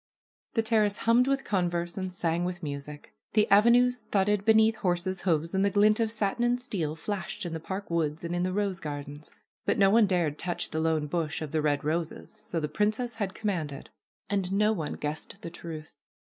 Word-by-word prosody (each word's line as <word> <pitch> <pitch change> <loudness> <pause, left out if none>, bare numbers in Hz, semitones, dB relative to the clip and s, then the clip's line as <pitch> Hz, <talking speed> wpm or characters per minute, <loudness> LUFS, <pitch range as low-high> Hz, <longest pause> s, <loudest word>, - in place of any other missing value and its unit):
The 225 - +3
terrace 215 -2 +2
hummed 240 +3 +3
with 275 0 +1
converse 175 -3 -1
and 185 -1 -3
sang 170 -1 -1
with 175 -1 -4
music. 145 0 -7 0.2
The 210 -1 +4
avenues 240 +4 +5
thudded 200 0 +2
beneath 220 0 +5
horses' 180 0 -1
hoofs, 165 -1 0
and 190 0 +2
the 200 - +4
glint 210 +2 +4
of 225 -1 +2
satin 220 +2 -1
and 240 +1 +2
steel 180 - -3
flashed 190 +2 -4
in 170 - -4
the 160 - -3
park 190 +3 -6
woods 160 -2 -1
and 170 +1 -2
in 175 - 0
the 185 +1 0
rose 195 -1 -1
gardens. 145 -1 -6 0.3
But - - +1
no 195 -1 +5
one 220 -1 +5
dared 170 -6 0
touch 175 0 -2
the 160 - -1
lone 160 -1 +1
bush 155 0 -2
of 150 - -6
the 155 -1 +1
red 145 -1 +1
roses, 160 +2 -2
so 215 -5 -3
the 150 - -1
princess 215 +9 0
had 190 -2 -2
commanded. 165 -10 -3 0.4
And 195 -2 -1
no 210 +2 +3
one 160 -7 -3
guessed 150 +5 -5
the 170 - -7
truth. 160 -2 -8
185 Hz, 200 wpm, -28 LUFS, 160-210 Hz, 0.4 s, avenues